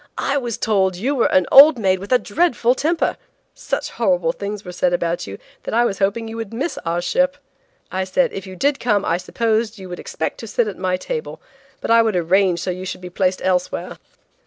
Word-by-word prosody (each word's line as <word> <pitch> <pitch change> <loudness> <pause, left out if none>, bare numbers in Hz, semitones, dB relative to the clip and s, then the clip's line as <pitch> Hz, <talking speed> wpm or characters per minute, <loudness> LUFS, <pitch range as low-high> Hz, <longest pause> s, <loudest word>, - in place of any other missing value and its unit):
"I 275 - 0
was 240 -5 -2
told 195 -5 +1
that - - -9
you 265 +8 0
were 265 - +2
an 185 -1 +4
old 285 +1 +9
maid 190 -4 +1
with 200 +5 -9
a 250 - +6
dreadful 245 0 +1
temper. 320 +5 0 0.4
Such - - -4
horrible - - +1
things 205 - -6
were 180 - -6
said 180 0 0
about 170 -4 -1
you 100 0 -7 0.2
that - - -4
I 240 +1 +4
was 195 -5 -2
hoping 200 +4 0
you 225 0 -7
would 225 -3 -5
miss 265 +9 -3
our 170 +1 -1
ship. 275 +8 +1 0.5
I 190 0 -1
said 245 +7 +1
if 195 0 -6
you 185 - -9
did 280 +9 +1
come 210 -4 +1
I 165 - +1
supposed 225 +3 -1
you 190 -2 -10
would 175 - -6
expect 160 - -4
to 225 - -7
sit 220 +2 0
at 200 - -6
my 185 0 0
table, 470 - -5 0.4
but - - -2
I 230 0 +7
would 220 -3 0
arrange 180 +1 +2
so 185 - -2
you 185 +1 -6
should 185 - -5
be 180 0 -8
placed 185 0 0
elsewhere." 180 -1 -1
205 Hz, 230 wpm, -20 LUFS, 185-240 Hz, 0.5 s, old